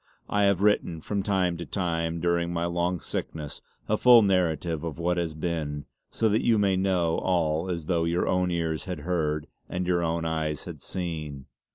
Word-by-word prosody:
I 105 0 +2
have 100 -2 +3
written, 90 -5 +2
from 100 +5 -2
time 95 -3 +1
to 85 - -5
time 85 -3 -1
during 85 0 +1
my 85 0 -1
long 85 +1 0
sickness, 75 -2 -5 0.3
a 110 - +2
full 120 -2 +8
narrative 85 -4 +1
of 85 -2 -4
what 85 +1 0
has 85 -3 -1
been; 75 -3 -3 0.2
so 115 - +1
that 105 +2 +2
you 115 -2 +4
may 100 -2 +3
know 95 -3 +1
all 85 -1 0
as 85 -3 -3
though 85 0 +1
your 85 +1 0
own 90 0 +2
ears 85 -1 -1
had 90 -6 -5
heard 75 -3 -1 0.2
and 90 +1 -2
your 90 -1 +2
own 85 0 -1
eyes 80 -2 -1
had - - -8
seen. 80 -7 -5
85 Hz, 190 wpm, -27 LUFS, 80-90 Hz, 0.3 s, full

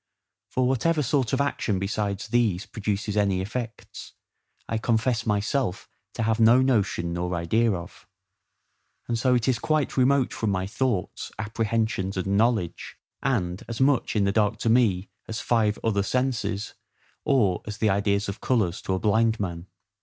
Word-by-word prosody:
For 130 -1 +1
whatever 150 +5 +1
sort 130 -3 +1
of 135 - +1
action 135 -7 0
besides 100 +1 -2
these 110 -6 +1
produces 105 -1 -3
any 100 -3 +2
effects, 115 +3 -6 0.5
I 115 - -1
confess 115 +1 0
myself 105 +1 -1 0.3
to - - -1
have 110 0 +1
no 115 +3 +6
notion 100 -9 +1
nor 90 +1 -2
idea 110 +7 +2
of; 85 -2 -8 1.0
and 115 -1 -1
so 125 +1 +3
it 120 - 0
is 130 -3 +2
quite 155 -3 0
remote 130 0 +3
from 110 - -1
my 95 -1 0
thoughts, 105 -2 -2
apprehensions, 110 -2 -1
and 95 +2 0
knowledge; 110 -5 0 0.2
and 90 +1 -1
as 115 -1 -5
much 135 -3 +2
in 105 - +3
the 100 - +2
dark 105 0 +1
to 115 - +1
me 105 -6 +2 0.2
as 110 - -4
five 110 -3 +1
other 105 -3 +1
senses, 110 -2 -1 0.5
or 105 -10 +2
as 105 0 -5
the 110 -3 +2
ideas 100 +1 +1
of 100 +2 -6
colours 105 -9 0
to 95 - -1
a - - -2
blind 110 +2 +2
man. 85 -3 -4
110 Hz, 160 wpm, -25 LUFS, 100-120 Hz, 1.0 s, no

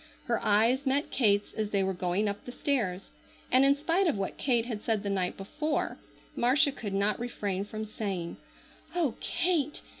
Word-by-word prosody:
Her - - 0
eyes 230 +7 +3
met 280 +3 +1
Kate's 205 -5 +2
as 215 -1 -2
they 200 -2 +1
were 190 0 0
going 180 +3 0
up 200 0 -3
the 245 - -6
stairs, 220 -9 -1 0.4
and 260 +1 +6
in 275 +1 +5
spite 335 +6 +1
of 295 - +1
what 195 -1 -3
Kate 240 -4 +1
had 225 -4 -4
said 220 -2 0
the 200 - -1
night 185 -2 -1
before 295 +10 -2 0.4
Marcia 280 +5 +4
could 210 -7 -5
not 200 +2 +2
refrain 205 -5 -2
from 215 +1 -5
saying: 195 -5 -4 0.6
"Oh, 320 -9 +1
Kate! 310 -5 0
220 Hz, 180 wpm, -29 LUFS, 200-275 Hz, 0.6 s, and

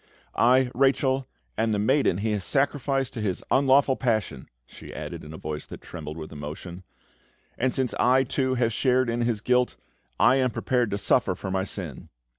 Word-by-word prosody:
"I, 125 +2 +4
Rachel, 135 0 +2 0.3
am 110 -1 +1
the - - +1
maiden 110 -2 +2
he 110 +2 -1
has 105 -2 -1
sacrificed 135 +3 0
to 115 - -5
his 100 -4 -2
unlawful 135 0 +4
passion!" 110 - -1 0.2
she - - -12
added, - - -7
in 75 - -10
a 80 - -8
voice 75 -1 -5
that - - -9
trembled 75 -2 -8
with 80 -1 -8
emotion. 75 +4 -7 0.7
"And, 130 +1 0
since 130 -2 -1
I, 130 +2 +4
too, 130 0 -1
have 120 -2 +1
shared 130 0 +2
in 120 +1 -1
his 115 -3 0
guilt, 125 +1 +2 0.4
I 130 - +5
am 130 -1 +2
prepared 125 0 0
to 100 - -2
suffer - - +2
for 95 - -6
my 95 0 0
sin!" 90 -9 -6
120 Hz, 185 wpm, -26 LUFS, 95-130 Hz, 0.7 s, I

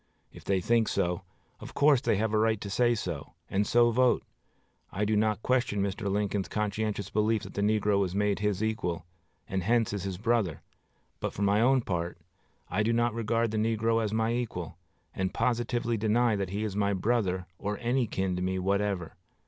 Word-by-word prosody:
If - - -12
they 95 -2 +1
think 115 +3 +2
so, 90 0 0 0.4
of - - -10
course 145 -3 +5
they 135 - +2
have 110 +2 0
a - - +3
right 110 -1 +2
to 100 - -5
say 120 +3 +3
so, - - -5 0.2
and 100 +1 +1
so 120 0 +4
vote. 125 +2 +3 0.7
I 105 +2 -1
do 110 +1 +1
not 110 0 +1
question 125 -5 +1
Mr. 100 +1 -2
Lincoln's 100 -1 -1
conscientious 105 -1 -2
belief 110 +1 +1
that - - -9
the 100 - -2
negro 105 -1 +2
was 95 -2 -1
made 105 0 +1
his 105 0 0
equal, 95 -7 -2 0.4
and 95 0 -1
hence 115 +2 +1
is 100 - -2
his 95 -1 -4
brother; 110 - 0 0.6
but, - - -3
for 100 - -2
my 100 +2 +3
own 130 +2 +4
part, 85 -5 -3 0.5
I 95 +5 0
do 110 +2 +2
not 120 0 +2
regard 115 0 0
the 110 - -2
negro 115 +1 +1
as 105 - -1
my 110 +1 +1
equal, 110 -9 -3 0.4
and 95 -1 -2
positively 120 -1 0
deny 110 +2 +2
that 100 -2 -2
he 100 +3 -2
is 105 -3 -3
my 100 0 +1
brother 95 -3 0
or 105 0 -2
any 125 0 0
kin 95 -2 -1
to - - -3
me 95 +1 -1
whatever.... 100 -2 -1
105 Hz, 195 wpm, -29 LUFS, 100-115 Hz, 0.7 s, course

